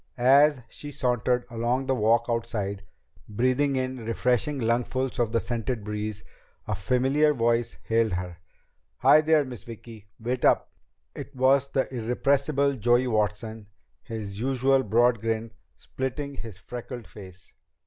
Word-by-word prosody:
As 140 Hz, +2 st, +5 dB
she 145 Hz, -, -9 dB
sauntered 125 Hz, -2 st, 0 dB
along 120 Hz, +3 st, -1 dB
the 135 Hz, -, +1 dB
walk 115 Hz, 0 st, +3 dB
outside, 105 Hz, -4 st, -2 dB, 0.5 s
breathing 130 Hz, +6 st, +1 dB
in 130 Hz, -2 st, -3 dB
refreshing 125 Hz, +5 st, 0 dB
lungfuls 125 Hz, +2 st, -1 dB
of 115 Hz, -2 st, +1 dB
the 115 Hz, -, +2 dB
scented 120 Hz, -1 st, -3 dB
breeze, 105 Hz, -1 st, -4 dB, 0.4 s
a 105 Hz, -, -1 dB
familiar 130 Hz, +9 st, +2 dB
voice 115 Hz, -1 st, 0 dB
hailed 115 Hz, -2 st, +1 dB
her: 90 Hz, -1 st, -4 dB, 0.6 s
"Hi 155 Hz, -, +7 dB
there, 155 Hz, -1 st, +3 dB
Miss 125 Hz, -6 st, -8 dB
Vicki! 115 Hz, -2 st, -11 dB
Wait 120 Hz, +2 st, -3 dB
up!" -, -, +3 dB, 0.4 s
It -, -, -9 dB
was 135 Hz, +1 st, +3 dB
the 135 Hz, -1 st, 0 dB
irrepressible 140 Hz, +4 st, +1 dB
Joey 120 Hz, +3 st, +3 dB
Watson, 110 Hz, -1 st, -2 dB, 0.3 s
his 105 Hz, -3 st, -6 dB
usual 135 Hz, +2 st, +2 dB
broad 120 Hz, +1 st, +3 dB
grin 115 Hz, +1 st, -2 dB, 0.2 s
splitting 140 Hz, +2 st, -5 dB
his 110 Hz, -5 st, -8 dB
freckled 120 Hz, +4 st, -8 dB
face. 95 Hz, -3 st, -13 dB
120 Hz, 135 wpm, -26 LUFS, 110-130 Hz, 0.6 s, Hi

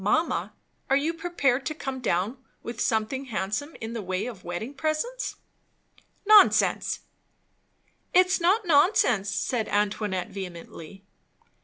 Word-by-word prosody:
Mamma, 315 Hz, -, +1 dB, 0.4 s
are 270 Hz, -, +4 dB
you 305 Hz, +4 st, 0 dB
prepared 285 Hz, -6 st, 0 dB
to 310 Hz, -, -3 dB
come 270 Hz, -3 st, -5 dB
down 230 Hz, +3 st, -1 dB, 0.2 s
with 235 Hz, -1 st, -5 dB
something 225 Hz, +5 st, 0 dB
handsome 220 Hz, +6 st, -3 dB
in 225 Hz, 0 st, -5 dB
the 230 Hz, -, -4 dB
way 185 Hz, 0 st, -2 dB
of 230 Hz, -7 st, -8 dB
wedding 175 Hz, +10 st, -5 dB
presents?" 310 Hz, -, -2 dB, 0.9 s
"Nonsense!" 425 Hz, 0 st, +5 dB, 1.1 s
"It's 365 Hz, +1 st, +4 dB
not 390 Hz, +5 st, +3 dB
nonsense!" 285 Hz, -, +3 dB
said 225 Hz, +2 st, -1 dB
Antoinette 205 Hz, -2 st, -1 dB
vehemently. 180 Hz, 0 st, -9 dB
245 Hz, 120 wpm, -26 LUFS, 205-310 Hz, 1.1 s, Nonsense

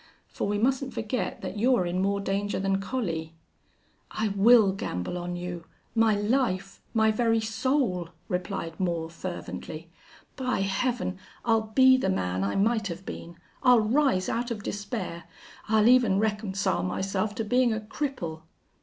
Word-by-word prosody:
For -, -, -3 dB
we 205 Hz, 0 st, 0 dB
mustn't 260 Hz, +3 st, 0 dB
forget 225 Hz, +3 st, -2 dB
that 190 Hz, +2 st, -5 dB
you're 245 Hz, -4 st, +3 dB
in 175 Hz, +1 st, -1 dB
more 200 Hz, +1 st, +1 dB
danger 200 Hz, +1 st, -1 dB
than 195 Hz, 0 st, 0 dB
Collie." 165 Hz, -8 st, -3 dB, 0.7 s
"I 220 Hz, 0 st, -1 dB
will 205 Hz, +1 st, +6 dB
gamble 90 Hz, -, -4 dB
on 175 Hz, 0 st, -4 dB
you 175 Hz, -1 st, -5 dB, 0.3 s
my 225 Hz, -2 st, +4 dB
life 205 Hz, -3 st, 0 dB
my 220 Hz, -1 st, +3 dB
very 225 Hz, 0 st, +2 dB
soul," 220 Hz, -, 0 dB, 0.2 s
replied 180 Hz, -3 st, -3 dB
Moore, 170 Hz, -3 st, -1 dB
fervently. 165 Hz, -2 st, -7 dB, 0.4 s
"By 255 Hz, -6 st, -1 dB
Heaven! 195 Hz, 0 st, -1 dB, 0.3 s
I'll 225 Hz, -2 st, +2 dB
be 260 Hz, -1 st, +7 dB
the -, -, 0 dB
man 95 Hz, 0 st, -1 dB
I 100 Hz, -, -1 dB
might 220 Hz, +1 st, +2 dB
have 180 Hz, +1 st, -7 dB
been. 170 Hz, 0 st, -8 dB, 0.2 s
I'll 250 Hz, -3 st, +6 dB
rise 230 Hz, -4 st, +2 dB
out 240 Hz, +1 st, -1 dB
of 215 Hz, -4 st, -4 dB
despair. 205 Hz, -5 st, -4 dB, 0.4 s
I'll 220 Hz, 0 st, +4 dB
even 240 Hz, -6 st, +5 dB
reconcile 205 Hz, -2 st, 0 dB
myself 195 Hz, +3 st, -1 dB
to 225 Hz, -, -2 dB
being 245 Hz, +2 st, +3 dB
a 220 Hz, -, -1 dB
cripple." 215 Hz, -, -4 dB
205 Hz, 150 wpm, -27 LUFS, 180-230 Hz, 0.7 s, be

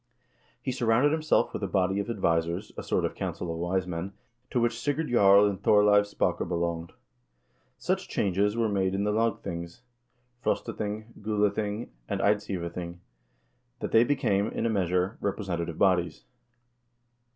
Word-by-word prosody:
He -, -, -1 dB
surrounded 125 Hz, +3 st, +2 dB
himself 155 Hz, 0 st, +1 dB
with -, -, -4 dB
a 100 Hz, -, -1 dB
body 95 Hz, 0 st, +1 dB
of 100 Hz, -, -3 dB
advisers, 85 Hz, -2 st, 0 dB
a -, -, -5 dB
sort -, -, 0 dB
of -, -, -2 dB
council 85 Hz, -, -4 dB
of 80 Hz, -, -6 dB
wise 90 Hz, +2 st, 0 dB
men, 90 Hz, +2 st, -5 dB, 0.4 s
to 125 Hz, -, 0 dB
which 120 Hz, 0 st, 0 dB
Sigurd 145 Hz, +4 st, -1 dB
Jarl 100 Hz, -4 st, +6 dB
and 100 Hz, -2 st, -3 dB
Thorleiv 105 Hz, 0 st, +5 dB
Spake -, -, -1 dB
belonged.1 85 Hz, -1 st, -2 dB, 0.8 s
Such -, -, -2 dB
changes 100 Hz, +3 st, +1 dB
were 115 Hz, -1 st, +2 dB
made 95 Hz, -2 st, 0 dB
in 100 Hz, -, 0 dB
the 105 Hz, -, +1 dB
lagthings 105 Hz, -3 st, -2 dB, 0.6 s
(Frostathing, 110 Hz, -1 st, -3 dB
Gulathing, 105 Hz, +1 st, -1 dB, 0.2 s
and -, -, -1 dB
Eidsivathing) 90 Hz, -4 st, -1 dB, 0.8 s
that -, -, -4 dB
they 115 Hz, -, +6 dB
became, 110 Hz, -7 st, +1 dB
in 115 Hz, -, -3 dB
a 115 Hz, -, +1 dB
measure, 90 Hz, 0 st, 0 dB
representative 90 Hz, -5 st, -3 dB
bodies. 90 Hz, -3 st, +2 dB
100 Hz, 145 wpm, -28 LUFS, 90-110 Hz, 0.8 s, Jarl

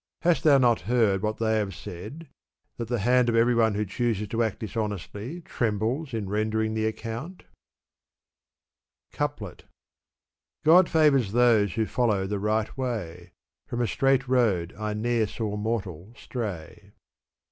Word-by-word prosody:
Hast 170 Hz, 0 st, +2 dB
thou 145 Hz, -3 st, +6 dB
not 120 Hz, -4 st, +3 dB
heard 110 Hz, -6 st, +2 dB
what 110 Hz, 0 st, -2 dB
they 110 Hz, -1 st, +1 dB
have 100 Hz, -2 st, -3 dB
said, 110 Hz, -, -9 dB, 0.3 s
' -, -, -52 dB
that 115 Hz, -, -4 dB
the 120 Hz, +1 st, -1 dB
hand 125 Hz, 0 st, +4 dB
of 115 Hz, -, +1 dB
every 120 Hz, +2 st, +4 dB
one 110 Hz, -3 st, +2 dB
who 105 Hz, +1 st, -1 dB
chooses 105 Hz, 0 st, -1 dB
to 115 Hz, +2 st, -1 dB
act 110 Hz, -3 st, 0 dB
dishonestly 110 Hz, -, -5 dB
trembles 120 Hz, +3 st, -2 dB
in 110 Hz, -4 st, -3 dB
rendering 110 Hz, +2 st, -1 dB
the 110 Hz, 0 st, 0 dB
accoimt*?" 120 Hz, +12 st, -7 dB, 1.7 s
Coup/ef. 145 Hz, -, -3 dB, 1.1 s
God 175 Hz, +4 st, +6 dB
favors 140 Hz, -10 st, +3 dB
those 115 Hz, -5 st, +4 dB
who 110 Hz, -1 st, +1 dB
follow 105 Hz, -5 st, 0 dB
the 100 Hz, +1 st, -2 dB
right 110 Hz, +1 st, -1 dB
way, 90 Hz, -9 st, -5 dB, 0.3 s
From 120 Hz, -, -4 dB
a 120 Hz, -, +2 dB
straight 135 Hz, +2 st, +1 dB
road 110 Hz, -10 st, +1 dB
I 105 Hz, 0 st, -3 dB
ne'er 115 Hz, 0 st, 0 dB
saw 105 Hz, -1 st, -4 dB
mortal 105 Hz, -3 st, -4 dB
stray. 100 Hz, -4 st, -7 dB
110 Hz, 145 wpm, -26 LUFS, 105-125 Hz, 1.7 s, thou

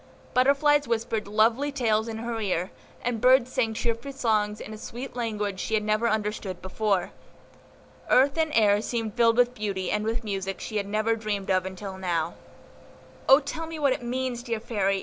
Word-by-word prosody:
Butterflies 285 Hz, +3 st, +4 dB
whispered 225 Hz, -2 st, -1 dB
lovely 225 Hz, +7 st, +2 dB
tales 225 Hz, -5 st, +1 dB
in 225 Hz, -1 st, -4 dB
her 230 Hz, 0 st, -3 dB
ear, 185 Hz, -3 st, -1 dB, 0.3 s
and 235 Hz, -3 st, -1 dB
birds 255 Hz, 0 st, +5 dB
sang 225 Hz, -3 st, 0 dB
cheerful 235 Hz, +4 st, -2 dB
songs 215 Hz, -5 st, 0 dB
in 215 Hz, -, -8 dB
a -, -, -7 dB
sweet 245 Hz, +3 st, -7 dB
language 210 Hz, -5 st, -2 dB
she 220 Hz, -, -1 dB
had 210 Hz, -, +1 dB
never 215 Hz, +2 st, +1 dB
understood 210 Hz, -3 st, -2 dB
before. 195 Hz, -1 st, -1 dB, 1.0 s
Earth 270 Hz, +2 st, +5 dB
and 320 Hz, -1 st, +1 dB
air 210 Hz, -2 st, +4 dB
seemed 225 Hz, -2 st, -3 dB
filled 230 Hz, -1 st, +3 dB
with 245 Hz, 0 st, +4 dB
beauty 200 Hz, -5 st, -3 dB
and 210 Hz, 0 st, 0 dB
with 225 Hz, +2 st, -2 dB
music 195 Hz, -2 st, -3 dB
she 215 Hz, -, -4 dB
had 200 Hz, -1 st, -2 dB
never 215 Hz, +2 st, +1 dB
dreamed 205 Hz, -3 st, -3 dB
of 185 Hz, 0 st, +2 dB
until 190 Hz, 0 st, -7 dB
now. 170 Hz, -3 st, -1 dB, 1.0 s
"O 270 Hz, +2 st, +9 dB
tell 310 Hz, +3 st, -5 dB
me 325 Hz, 0 st, -6 dB
what 280 Hz, -3 st, +3 dB
it -, -, -5 dB
means, 245 Hz, 0 st, -2 dB
dear 235 Hz, -3 st, -3 dB
Fairy! 200 Hz, -4 st, 0 dB
220 Hz, 185 wpm, -26 LUFS, 205-245 Hz, 1.0 s, O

